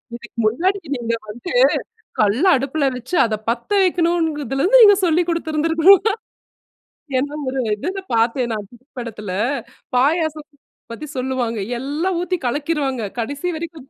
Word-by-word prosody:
இதுக்கு 235 0 -11 0.2
முன்னாடி, 370 - +1 0.2
நீங்க 235 -2 -2
வந்து 240 - -7 0.7
கல்ல 215 - +2
அடுப்பில 275 +2 -1
வைத்து 250 +8 -5
அதை 220 -2 -1
பத்த 235 0 -2
வைக்கணும்ங்கிறதுல 325 -7 0
இருந்து - - +6
நீங்க 410 -2 +8
சொல்லிக் 340 +1 +2
கொடுத்திருந்திருக்கணும். 330 +3 +4 1.2
என்ன 290 +3 -2
ஒரு 265 0 -2 0.2
இதில 370 - -4
பார்த்தேன், 235 +2 +1
நான் 210 -2 -4
தமிழ் 250 +4 -21
படத்தில. 215 -5 -6 0.6
பாயாசம் 310 +2 +1 0.4
பத்தி 265 +7 -7
சொல்லுவாங்க. 255 -3 -2 0.2
எல்லாம் 305 +8 -2
ஊத்தி 360 +1 -1
கலக்கிருவாங்க. 280 -2 -1 0.2
கடைசி 285 +9 -3
வரைக்கும். 315 -4 -7
285 Hz, 125 wpm, -20 LUFS, 240-335 Hz, 1.2 s, நீங்க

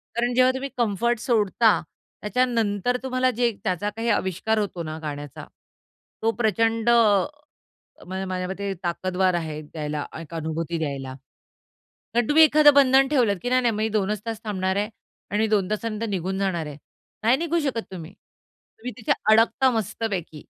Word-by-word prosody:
कारण 240 +1 0
जेव्हा 255 0 +5
तुम्ही 270 +1 -4
कम्फर्ट 235 +1 +1
सोडता, 220 -2 +2 0.4
त्याच्यानंतर 230 0 0
तुम्हाला 255 0 +1
जे 240 0 +1
त्याचा 190 +1 -1
काही 225 +3 -3
अविष्कार 190 +4 0
होतो 185 -4 -3
ना, 155 0 -5
गाण्याचा, 145 -2 -7 0.8
तो 225 +1 +2
प्रचंड 225 0 +1
म 235 +6 +2 0.6
अ, 190 0 -3
माझ्या 185 -1 -3
मते 195 +1 -3
ताकदवार 185 +1 0
आहे 155 -3 -3
द्यायला. 150 -1 -5 0.2
एक 165 0 -10
अनुभूती 165 +1 -3
द्यायला. 135 -4 -4 1.0
कारण 240 -1 +2
तुम्ही 315 +2 +7
एखादं 300 -2 +6
बंधन 270 -1 +5
ठेवलत, 245 -8 +2
की 245 - -2
नाही, 255 0 +4
नाही 235 - +2 0.2
मग - - -8
2च 210 -1 0
तास 225 -1 -4
थांबणार 190 -2 -1
आहे 205 +1 0 0.4
आणि 215 +2 +1
2 205 -2 +1
तासानंतर 220 +1 -2
निघून 190 -1 -2
जाणार 185 -5 -1
आहे. 145 -1 -8 0.5
नाही 235 +4 +4
निघू 340 +2 -1
शकत 260 -6 -1
तुम्ही, 175 -1 -8
तुम्ही 240 +4 -13
तिथे 225 - 0 0.2
अडकता 230 +4 +4
मस्तपैकी. 200 -8 -3
215 Hz, 155 wpm, -24 LUFS, 185-240 Hz, 1.0 s, तुम्ही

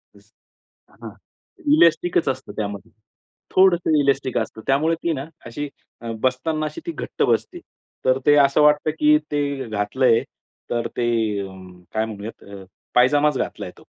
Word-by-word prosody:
Yes. - - -22 0.6
हां. - - -11 0.6
इलास्टिकच 170 - +3
असतं 130 - -4
त्यामध्ये. 100 0 -5 0.6
थोडंसं 175 -4 +4
इलास्टिक 135 -2 +1
असतं. 110 - -3
त्यामुळे 155 +5 +2
ती 170 - +1
ना 135 -2 -4 0.2
अशी 130 +5 -5 0.3
अ, 115 -1 -5
बसताना 155 +5 0
अशी 335 - -6
ती 340 - -3
घट्ट - - -7
बसते. 350 - 0 0.5
तर 130 0 +4
ते 145 - +6
असं 140 +1 +4
वाटतं 150 +1 +4
की 150 0 +5
ते 140 -3 -2
घातलंय 115 +3 +2 0.5
तर 120 -1 -1
ते 120 - +1 0.9
काय 110 0 0
म्हणूयात 110 0 -8
अ, 100 -1 -11 0.3
पायजामाच 145 +3 +4
घातलाय - - -4
तो. - - -17
140 Hz, 140 wpm, -22 LUFS, 120-155 Hz, 0.9 s, ते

